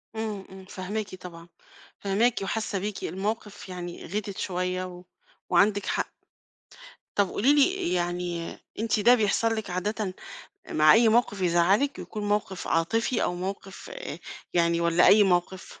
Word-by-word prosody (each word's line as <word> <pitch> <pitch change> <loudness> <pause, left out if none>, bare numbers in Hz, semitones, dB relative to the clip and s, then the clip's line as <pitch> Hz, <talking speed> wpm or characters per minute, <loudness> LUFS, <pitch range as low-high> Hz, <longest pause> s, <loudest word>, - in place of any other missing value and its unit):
امم، 215 -3 -4
امم، 190 0 -12
فاهماكِ 195 +1 -5
طبعًا، 170 -2 -11 0.5
فاهماكِ 215 +5 +1
وحاسة 210 -1 -2
بيكِ، 205 +1 -4
الموقف 205 +2 -4
يعني 175 -1 -7
غِتت 200 +1 -4
شوية 185 0 -2
و 180 0 -10 0.5
وعندِك 205 -1 +3
حق، - - -2 1.0
طَب 200 -3 +2
قولي 270 +8 +3
لي 295 - +2
يعني 175 -1 -2 0.2
أنتِ 225 -1 +1
ده 240 +4 +6
بيحصل 225 +1 +1
لِك 220 -3 -4
عادةً 190 +2 -2 0.6
مع 155 0 +6
أي 225 0 +6
موقف 220 -3 +2
يزعّلِك 185 +11 +3
يكون 210 -1 -5
موقف 205 -3 -1
عاطفي 225 +9 +1
أو 180 - 0
موقف 195 - -6 0.6
يعني 170 0 +3
والَّا 170 +1 +4
أي 210 +1 +7
موقف؟ 185 0 -1
195 Hz, 135 wpm, -27 LUFS, 180-215 Hz, 1.0 s, أي